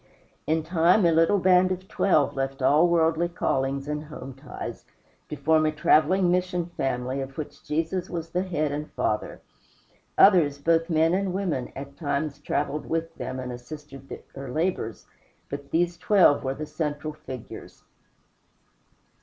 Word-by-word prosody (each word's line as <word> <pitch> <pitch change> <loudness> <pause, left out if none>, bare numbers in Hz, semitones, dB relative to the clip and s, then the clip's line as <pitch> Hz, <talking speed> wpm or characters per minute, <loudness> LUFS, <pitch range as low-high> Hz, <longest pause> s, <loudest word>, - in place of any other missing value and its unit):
In 160 0 +1
time, 175 +4 +3
a 170 - +5
little 165 +5 +4
band 185 0 +4
of 185 +1 -4
twelve 155 -8 +2
left 135 0 -3
all 150 +6 +5
worldly 165 0 +2
callings 135 -4 -1
and 150 +1 -3
home 135 -3 -9
ties, 135 +1 -8 0.5
to - - -4
form 160 0 +3
a - - +1
traveling 160 +4 +3
mission 180 -1 0
family 130 0 -2
of 135 0 -7
which 155 - -7
Jesus 165 +4 -2
was 165 -1 -5
the 180 - 0
head 155 -6 -1
and 150 +1 -4
father. 105 - -2 0.8
Others, 165 -8 +6
both 165 +3 +1
men 160 +1 +3
and 190 -1 0
women, 175 -10 -2
at 140 +1 -8
times 145 -1 -2
traveled 150 0 -2
with 165 0 -2
them 130 -2 -5
and 125 -1 -5
assisted 135 +2 -10 0.2
their 135 0 -7
labors; 155 - -2 0.5
but 140 0 -6
these 175 +1 0
twelve 185 -7 +4
were 135 0 -2
the 155 - -5
central 150 0 -3
figures. 130 -6 -10
155 Hz, 155 wpm, -26 LUFS, 140-175 Hz, 0.8 s, Others